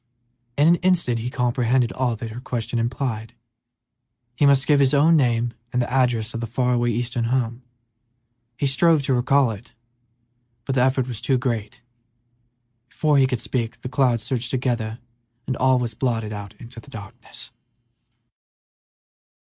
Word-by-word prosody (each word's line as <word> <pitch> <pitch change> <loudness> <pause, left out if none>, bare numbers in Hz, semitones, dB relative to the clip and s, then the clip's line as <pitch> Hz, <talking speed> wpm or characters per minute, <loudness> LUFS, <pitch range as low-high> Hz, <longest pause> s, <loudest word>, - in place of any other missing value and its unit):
In 145 +2 +4
an 170 - +6
instant 175 -11 +1
he 120 +2 -3
comprehended 125 -1 +1
all 125 -3 -1
that 115 0 -7
her 120 +3 -8
question 120 -2 -3
implied; 115 -1 -3 1.0
he 145 +4 +3
must 140 -1 +4
give 145 0 +4
his 140 +1 +3
own 155 +4 +5
name 120 -4 +1 0.2
and 125 - 0
the 120 - -1
address 120 -4 +1
of 115 - -4
the 115 - -4
far 125 +2 0
away 120 0 +1
eastern 120 +1 -1
home. 120 0 -1 1.0
He - - -1
strove 155 +2 +3
to 135 - +1
recall 130 0 +3
it, 115 +3 -10 0.9
but 135 - -1
the 130 - +2
effort 130 0 +2
was 120 -4 -4
too 135 - +2
great; 115 -4 -3 1.1
before 150 +2 +2
he 130 - +4
could 125 -2 -2
speak, 115 -3 -3
the 125 - -5
clouds 125 -5 +1
surged 120 -1 -2
together 120 -4 -1 0.5
and 130 - -2
all 130 0 +3
was 120 -2 -2
blotted 115 -3 -2
out 100 -1 -8
in 115 - -12 0.2
darkness. 110 +2 -9
125 Hz, 155 wpm, -23 LUFS, 115-130 Hz, 1.1 s, an